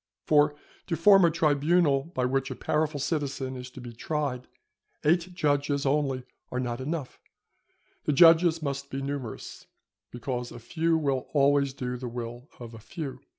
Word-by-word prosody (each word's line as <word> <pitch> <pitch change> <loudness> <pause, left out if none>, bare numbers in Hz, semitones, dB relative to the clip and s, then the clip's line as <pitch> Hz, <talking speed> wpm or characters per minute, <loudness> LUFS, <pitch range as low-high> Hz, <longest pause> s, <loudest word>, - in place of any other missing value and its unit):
For 150 -1 +4 0.3
to 170 - 0
form 195 +3 +7
a - - +5
tribunal 150 -2 +2
by 125 - +1
which 135 +2 0
a 130 - -5
powerful 155 +1 -1
citizen 140 -3 -2
is 125 0 -7
to 130 - -12
be 120 -1 -9
tried, 130 0 -3 0.6
eight 175 +3 +2
judges 145 -3 0
only 135 -2 +1 0.3
are 125 - -2
not 120 0 -3
enough; 150 -1 -4 0.9
the - - +2
judges 165 +1 +6
must 140 -1 -3
be 135 +1 -4
numerous, 135 -5 -6 0.4
because 125 0 -4
a - - -9
few 160 +8 0
will 140 -4 -1
always 140 -1 +3
do 125 -2 -4
the 125 0 -6
will 120 +2 -7
of 120 -1 -9
a 115 - -10
few. 135 +5 -7
140 Hz, 160 wpm, -27 LUFS, 125-155 Hz, 0.9 s, form